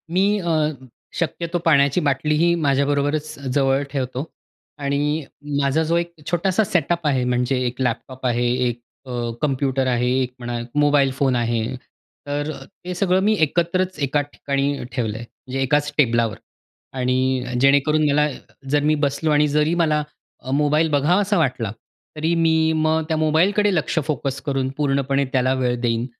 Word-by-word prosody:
मी 190 +2 +4
अ, 170 -3 -2 0.7
शक्यतो 170 +2 -2
पाण्याची 140 -1 +4
बाटलीही 150 +3 +2
माझ्याबरोबरच 145 +2 0 0.2
जवळ 135 0 +2
ठेवतो. 130 -1 -3 0.6
आणि 145 +2 -1 0.4
माझा 140 +3 +2
जो 165 +2 0
एक 170 0 -2 0.2
छोटासा 185 +4 +2
सेटअप 170 -3 0
आहे, 135 -3 +1
म्हणजे 125 +1 0
एक 125 +1 -3
लॅपटॉप 130 +1 -3
आहे, 120 0 +1 0.2
एक 120 0 -3 0.3
अ, 130 - -8 0.3
कॉम्प्युटर 135 -2 0
आहे, 125 0 +1
एक 125 -1 -3
म्हणा 120 0 -4 0.2
मोबाईल 145 -2 +4
फोन 135 -3 +2
आहे, 115 -2 0 0.6
तर 145 +1 -2
अ, - - -9 0.2
ते 180 +1 -4
सगळं 185 0 +2
मी 215 +2 +3
एकत्रच 170 +3 0
एकाच 145 +1 0
ठिकाणी 140 0 -1
ठेवलं 110 -4 -2
आहे. 120 - -7 0.2
म्हणजे 135 +1 -3
एकाच 145 +2 +1
टेबलावर. 115 -6 +2 0.6
आणि 130 0 0 0.2
जेणेकरून 145 +3 +4
मला 150 +1 +3 0.4
जर 145 +1 +2
मी 155 +1 +3
बसलो 145 +3 -1
आणि 150 0 +4
जरी 150 +2 +1
मला 155 -3 +2 0.4
अ, 130 - -5
मोबाईल 150 +3 +2
बघावासा 180 +8 +2
वाटला, 130 -9 0 0.5
तरी 160 +2 0
मी 160 -1 +3
मग 155 0 +1
त्या 160 -1 0
मोबालकडे 185 +7 +2
लक्ष 160 - -1
फोकस 140 -2 -2
करून 135 -3 -1
पूर्णपणे 140 -1 +1
त्याला 130 0 +2
वेळ 125 -2 0
देईन 115 -1 0
145 Hz, 150 wpm, -21 LUFS, 130-160 Hz, 0.7 s, मी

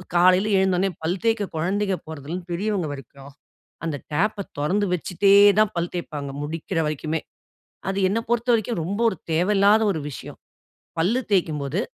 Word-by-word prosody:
காலையில 185 +4 +5
எழுந்தோனே, 190 0 +2
பல் 175 +4 -1
தேய்க்க 225 -2 +2
குழந்தைங்க 190 +4 0
போறதுலருந்து 160 +4 -7
பெரியவங்க 190 -2 -1
வரைக்கும், 135 +1 -11 0.5
அந்த 155 -3 -2 0.2
டேப்ப 210 +7 +1 0.2
தொறந்து 190 +8 +1
வச்சுட்டேதான் 200 +4 +4
பல் 170 0 -2
தேப்பாங்க, 150 -5 -5
முடிக்கிற 165 +3 -4
வரைக்குமே. 155 +1 -2 0.7
அது 195 - -2
என்ன 205 +4 0
பொறுத்தவரைக்கும், 235 -3 +1
ரொம்ப 200 +5 -3
ஒரு 190 - -2 0.2
தேவையில்லாத 200 +5 +4
ஒரு 160 - -4
விஷயம். - - -9 0.6
பல்லு 215 +10 +2
தேய்க்கும்போது, 155 -3 0
185 Hz, 130 wpm, -23 LUFS, 160-205 Hz, 0.7 s, காலையில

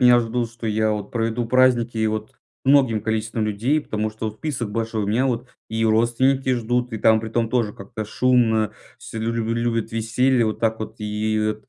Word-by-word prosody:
меня 125 -1 +7
ждут, 115 0 -2
что 120 -1 -7
я 110 0 +1
вот 105 -1 -4
проведу 115 0 -1
праздники, 120 -3 +3
вот 110 0 -3 0.3
многим 130 -5 +4
количеством 110 +1 -1
людей. 120 +9 +1
Потому 110 -5 -3
что 110 +1 -5
вот 105 - -4
список 125 -8 -3
большой 110 -2 -2
у - - -4
меня, 120 +6 +2
вот 125 0 -2 0.2
и 115 0 0
родственники 130 +4 +2
ждут 120 +1 -1
и, 110 - -3
там, 110 +1 +4
при 110 - -5
том 115 0 0
тоже 115 -4 0
как-то 105 +2 -7
шумно, 110 -2 +2 0.3
все 110 - -8
лю 115 +1 -1
лю 115 0 -1
любят 115 -1 -1
веселье 120 +3 +2
вот 110 -1 -2
так 110 -1 0
вот. 110 +1 -6
И 110 0 -1
115 Hz, 195 wpm, -22 LUFS, 110-120 Hz, 0.3 s, меня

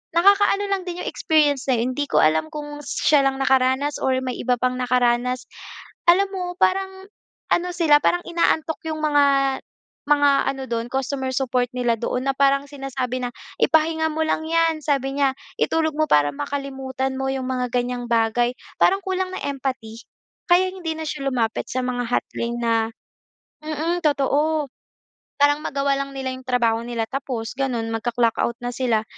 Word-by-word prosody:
Nakakaano 400 +3 +4
lang 390 -2 0
din 355 0 -4
'yong - - -5
experience 295 -4 +2
na 250 - +3
yun, 250 +3 -1
hindi 290 +1 -1
ko - - +4
alam 155 - +3
kung 295 -1 -6
siya 285 0 +3
lang 270 0 +1
nakaranas 265 +2 +2
or 260 -1 +2
may 255 -1 -3
iba 250 +1 +1
pang 255 0 0
nakaranas. 250 0 +1 0.7
Alam 395 +3 +3
mo 370 - -2 0.2
parang 380 0 0 0.5
ano 355 +1 +1
sila, 315 -4 +4
parang 350 - +3
inaantok 330 -2 +1
'yong 315 -1 -3
mga 290 -2 +4 0.8
mga 290 -1 +5 0.2
ano 270 -1 -6
do'n, 230 -1 -1
customer 265 0 -2
support 250 -2 +1
nila 240 -2 +1
doon 250 +3 -2
na - - +2
parang 275 0 +3
sinasabi 265 -3 -4
na, - - -2 0.3
"Ipahinga 320 0 +3
mo 315 - -2
lang 315 0 -1
'yan." 330 0 +2
sabi 275 -2 0
niya, 275 -2 +2 0.3
"Itulog 320 -1 +1
mo 310 - +3
para 145 -1 +4
makalimutan 265 - -4
mo 265 - -2
'yong 265 -1 -2
mga 250 -1 -1
ganyang 245 0 -1
bagay." 235 +1 +2 0.3
Parang 390 +1 +4
kulang 375 -1 -1
ng - - -5
empathy. 260 -5 -4 0.5
Kaya 365 +2 +5
hindi 345 -4 -4
na 320 - -5
siya 275 -2 -5
lumapit 230 -4 -1
sa 255 - -1
mga 245 -1 -2
hotline 235 0 -2
na 225 -1 +1 0.8
mm 320 +3 -2
totoo, 295 +1 +1 0.7
parang 290 +1 +4
magawa 275 -1 0
lang 275 0 -3
nila 265 -1 -3
'yong 260 - -11
trabaho 235 -3 +2
nila 235 -1 -2
tapos 255 -5 -4
gano'n 245 -4 -1
mag-ka-clock-out 235 0 0
na 245 - -2
sila. 235 -4 +1
270 Hz, 165 wpm, -22 LUFS, 245-310 Hz, 0.8 s, mga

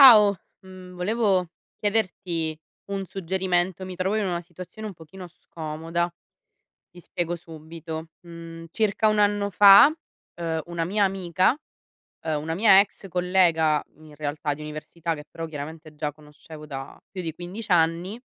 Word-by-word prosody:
Ciao, 210 -6 +9 0.3
mhmm, 185 -1 -11
volevo 195 -1 +1 0.3
chiederti 180 -7 -1 0.3
un 195 -1 -2
suggerimento. 185 0 -1
Mi 185 -1 -7
trovo 190 +3 0
in 215 -2 +1
una 175 -2 -1
situazione 180 +5 -9
un 205 - -7
pochino 170 +3 -11
scomoda. 165 +1 -4 0.8
Ti 175 - -14
spiego 175 0 -3
subito: 160 0 -8
mhmm, 165 -1 -10
circa 215 +1 +2
1 215 0 +2
anno 205 0 +2
fa, 200 +5 +9 0.5
uhm, 165 -2 -2
una 170 -1 -2
mia 200 +3 +2
amica 185 - +1 0.7
uhm, 155 -2 -1
una 160 +2 -3
mia 195 0 +7
ex 200 0 -1
collega 175 -4 +3
in 155 -1 -15
realtà, 145 0 -2
di 150 - -10
università 155 +2 -4
che 150 -2 -8
però 165 0 -6
chiaramente 155 +1 -8
già 150 0 -2
conoscevo 150 +1 -13
da 135 -2 -7
più 190 - -5
di 165 -2 -4
15 185 +6 -7
anni, 170 +5 +2
175 Hz, 145 wpm, -25 LUFS, 160-190 Hz, 0.8 s, Ciao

